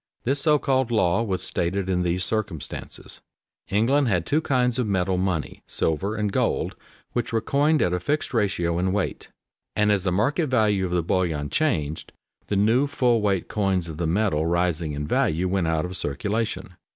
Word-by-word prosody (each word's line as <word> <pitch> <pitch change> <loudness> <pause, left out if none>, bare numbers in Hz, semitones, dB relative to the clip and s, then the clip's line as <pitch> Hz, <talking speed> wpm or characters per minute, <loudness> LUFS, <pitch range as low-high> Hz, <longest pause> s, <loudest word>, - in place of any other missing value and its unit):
_ - - -45
This 135 +3 0
so 150 0 +4
called 130 -3 +1
"law" 100 -4 +2
was 95 -5 -2
stated 90 +2 -1
in 90 -1 +1
these 90 +1 0
circumstances: 100 -7 -4 0.5
England 125 +7 +2
had 90 -6 +1
two 155 +2 +1
kinds 125 -4 +1
of 125 - 0
metal 95 -2 +1
money, 90 -5 -2
silver 95 +7 -1
and 105 -2 -1
gold, - - 0 0.4
which 120 - -2
were 115 - +2
coined 145 +5 +2
at 90 - +1
a 90 - 0
fixed 145 - -2
ratio 85 -6 0
in 95 +1 0
weight; 100 -2 -2 0.5
and 105 0 +3
as 100 -3 +1
the 95 - 0
market 145 - +1
value 105 -7 +2
of - - -7
the 90 -1 +1
bullion 80 -5 -1
changed, 80 - -1 0.3
the 105 - -1
new 115 +8 +3
full 125 -5 +2
weight 100 -4 0
coins 95 -4 0
of 80 -2 -7
the 85 -1 -1
metal 85 -3 +1
rising 85 -2 0
in 75 +1 -3
value 80 +4 +1
went 90 -2 0
out 80 0 0
of 90 +1 -6
circulation. 105 +5 -3
95 Hz, 190 wpm, -24 LUFS, 85-115 Hz, 0.5 s, so